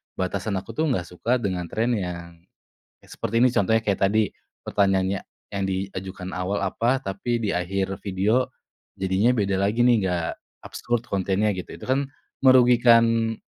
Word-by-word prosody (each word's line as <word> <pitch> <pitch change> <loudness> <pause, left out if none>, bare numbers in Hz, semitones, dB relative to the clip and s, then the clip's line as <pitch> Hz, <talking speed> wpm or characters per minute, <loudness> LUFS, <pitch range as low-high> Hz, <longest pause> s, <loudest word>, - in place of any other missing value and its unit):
batasan 100 +3 -2
aku 95 +3 -5
tuh 155 +8 0
nggak 115 -11 0
suka 110 +9 -1
dengan 95 -7 -2
tren 115 +7 -1
yang 85 -5 -4 0.7
seperti 115 +2 -1
ini, 130 - +5
contohnya 110 +1 +2
kayak 100 -2 0
tadi, 110 0 +1 0.3
pertanyaannya 95 -1 +1 0.3
yang 100 -1 -2
diajukan 95 -1 -4
awal 90 +3 -2
apa, 115 +7 +1
tapi 100 +5 -2
di 105 - 0
akhir 95 +2 -2
video 105 +6 +1 0.5
jadinya 95 +5 +2
beda 100 -3 0
lagi 105 +5 +2
nih, 120 -1 +5
nggak 85 -3 -1 0.4
absurd 120 -1 -3
kontennya 100 +2 +1
gitu, 90 -2 -7
itu - - -11
kan 135 +2 0 0.3
merugikan, 120 -3 +5
100 Hz, 145 wpm, -24 LUFS, 95-115 Hz, 0.7 s, ini